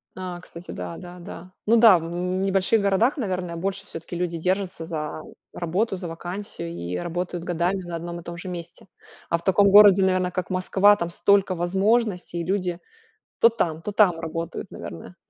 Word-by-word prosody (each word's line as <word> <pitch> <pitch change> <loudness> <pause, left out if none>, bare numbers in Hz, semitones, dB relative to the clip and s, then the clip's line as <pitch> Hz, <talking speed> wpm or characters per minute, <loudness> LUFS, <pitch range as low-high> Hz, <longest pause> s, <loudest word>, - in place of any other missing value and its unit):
А. 180 -1 -6
Кстати, 170 +1 -11
да, 170 - -6
да, 180 0 -10
да. 175 +1 -10
Ну 230 +2 +4
да, 220 -5 +8
в 165 - -4
в 165 - -6 0.2
небольших 195 +3 +2
городах, 200 +8 +2
наверное, 185 -7 -3
больше 195 +3 -3
всё-таки 165 0 -8
люди 170 -1 -2
держатся 185 -1 -2
за 155 -2 -4 0.3
работу, 190 +5 -1
за 180 -2 -6
вакансию 175 - -6
и 85 +1 -5
работают 175 - -4
годами 180 +2 -1
на 175 -1 -6
одном 170 +1 -5
и 170 - -12
том 170 0 -7
же 185 - -8
месте. 175 -1 -8 0.4
А 170 - +2
в 170 - -13
таком 200 +1 +4
городе, 200 -2 +8
наверно, 185 -1 +1
как 180 0 -3
Москва, 190 +2 +4
там 170 -3 -3
столько 195 +1 +2
возможностей 190 0 0
и - - -3
люди 180 -2 -1 0.6
то 230 - +8
там, 165 -8 -2
то 210 - -4
там 195 -5 +4
работают, 165 +1 -5
наверное. 85 +2 -9
180 Hz, 185 wpm, -24 LUFS, 170-195 Hz, 0.6 s, да